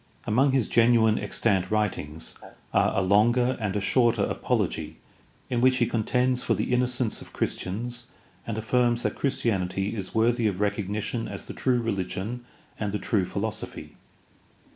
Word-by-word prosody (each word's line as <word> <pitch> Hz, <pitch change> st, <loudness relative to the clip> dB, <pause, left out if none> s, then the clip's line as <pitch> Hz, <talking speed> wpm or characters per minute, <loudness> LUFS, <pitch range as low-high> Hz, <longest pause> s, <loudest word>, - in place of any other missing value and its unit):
Among 135 Hz, +6 st, +3 dB
his 130 Hz, -5 st, +1 dB
genuine 115 Hz, -2 st, +4 dB
extant 95 Hz, -5 st, 0 dB
writings 100 Hz, -8 st, -2 dB, 0.4 s
are -, -, +2 dB
a 95 Hz, -, +3 dB
longer 120 Hz, +6 st, +3 dB
and 105 Hz, -2 st, -1 dB
a -, -, +1 dB
shorter 120 Hz, +3 st, +3 dB
apology -, -, -1 dB, 0.5 s
in 120 Hz, -2 st, -1 dB
which 130 Hz, 0 st, +4 dB
he 120 Hz, -, +3 dB
contends 125 Hz, +3 st, +1 dB
for -, -, +1 dB
the -, -, -1 dB
innocence 125 Hz, -2 st, 0 dB
of -, -, -13 dB
Christians 120 Hz, +5 st, -3 dB, 0.4 s
and 110 Hz, -2 st, -3 dB
affirms 120 Hz, +1 st, +1 dB
that -, -, 0 dB
Christianity 100 Hz, -6 st, -1 dB
is 100 Hz, -1 st, -6 dB
worthy 115 Hz, +1 st, +3 dB
of 95 Hz, -3 st, -2 dB
recognition 105 Hz, +2 st, -1 dB
as -, -, -7 dB
the -, -, -7 dB
true 125 Hz, -2 st, +1 dB
rehgion 100 Hz, +2 st, -3 dB, 0.4 s
and 105 Hz, -2 st, -1 dB
the 105 Hz, -, -1 dB
true 100 Hz, -3 st, 0 dB
philosophy. 110 Hz, +3 st, -5 dB
110 Hz, 150 wpm, -26 LUFS, 100-120 Hz, 0.5 s, genuine